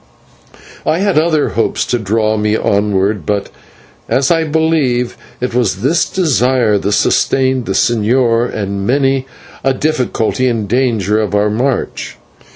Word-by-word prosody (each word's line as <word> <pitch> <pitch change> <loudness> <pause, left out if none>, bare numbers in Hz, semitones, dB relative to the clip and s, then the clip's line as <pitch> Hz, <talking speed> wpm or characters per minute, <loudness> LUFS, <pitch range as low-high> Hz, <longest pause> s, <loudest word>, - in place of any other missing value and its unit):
I 160 - +1
had 195 -4 +2
other 155 -2 +1
hopes 115 - -1
to 120 - -1
draw 110 +1 0
me 105 0 0
onward, 100 -2 0
but, 100 +4 -2 0.6
as 135 +3 +2
I 165 -1 +2
believe, 150 -6 0 0.2
it 125 -1 -3
was 110 -5 0
this 155 +5 +1
desire 125 - +1
that 100 - -2
sustained 130 +1 +1
the 95 - -1
señor 115 +3 +1
in 100 -2 -3
many 135 +3 +1 0.4
a 135 0 +1
difficulty 130 -4 0
and 115 -4 -1
danger 110 -3 +1
of 105 -1 -2
our 105 +1 +2
march. 125 +4 -2
120 Hz, 140 wpm, -14 LUFS, 105-135 Hz, 0.6 s, had